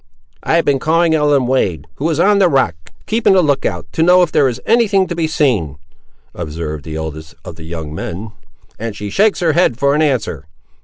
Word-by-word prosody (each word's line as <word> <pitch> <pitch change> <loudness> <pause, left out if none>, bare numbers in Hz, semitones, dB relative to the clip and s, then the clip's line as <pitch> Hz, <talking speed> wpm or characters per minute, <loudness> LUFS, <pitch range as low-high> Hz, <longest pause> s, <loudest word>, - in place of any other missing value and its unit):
"I - - 0
have 170 - +2
been 140 -2 +2
calling 165 +3 +2
Ellen 145 -4 +2
Wade, 120 -10 0
who 155 +4 -1
is 160 -1 -1
on 200 +3 +4
the 185 -3 +4
rock 135 - +2 0.3
keeping 220 -1 +2
the 185 -2 +4
look 145 -3 +1
out, 90 -3 -5
to - - -2
know 180 +2 +5
if 170 - -2
there 135 - +3
is 125 0 -5
any 230 0 +3
thing 195 -2 +2
to 175 - -5
be 165 -1 0
seen," 110 - 0 0.6
observed 75 -1 -6
the 80 -1 -6
eldest 80 0 -7
of - - -8
the 80 0 -11
young 80 -2 -6
men; 95 +7 -6 0.5
"and 115 -1 -5
she 105 0 -6
shakes 210 -1 +2
her 165 -3 +2
head, 170 -9 +2
for 140 +1 +2
an 150 - +1
answer. 110 - -1
140 Hz, 220 wpm, -16 LUFS, -, 0.6 s, know